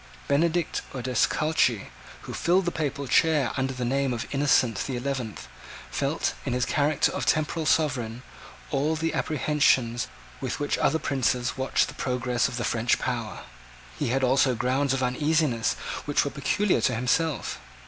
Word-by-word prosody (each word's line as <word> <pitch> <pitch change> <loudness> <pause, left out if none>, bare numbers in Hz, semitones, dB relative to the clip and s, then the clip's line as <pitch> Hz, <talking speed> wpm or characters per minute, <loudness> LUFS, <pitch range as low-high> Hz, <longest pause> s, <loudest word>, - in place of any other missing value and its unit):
Benedict 165 +4 +1
Odescalchi, 130 -1 +1 0.3
who - - -8
filled 180 +2 +2
the 175 - 0
papal 140 -3 -3
chair 150 -3 +3
under 130 0 -1
the 125 -1 -3
name 135 +1 0
of 115 - -3
Innocent 135 -6 +3
the 130 -3 -3
Eleventh, 125 -4 -4 0.4
felt, - - -1
in - - -2
his 125 0 +1
character 150 -2 +2
of - - -3
temporal 155 +1 +1
sovereign, 125 -7 0 0.5
all 150 +3 +1
those 165 +1 -1
apprehensions 135 -6 +1 0.3
with 130 -2 -3
which 145 0 -1
other 155 - +3
princes 125 -4 0
watched 130 0 +1
the - - -8
progress 125 -1 0
of 120 - -6
the 120 - -2
French 120 0 +1
power. 115 -4 -4 0.6
He - - 0
had 130 +3 0
also 130 0 +3
grounds 130 +3 +1
of 130 - -1
uneasiness 145 -2 +1 0.3
which 145 0 +1
were 140 - -2
peculiar 185 +8 +1
to 125 - +2
himself. 130 +5 0
135 Hz, 155 wpm, -26 LUFS, 125-150 Hz, 0.6 s, chair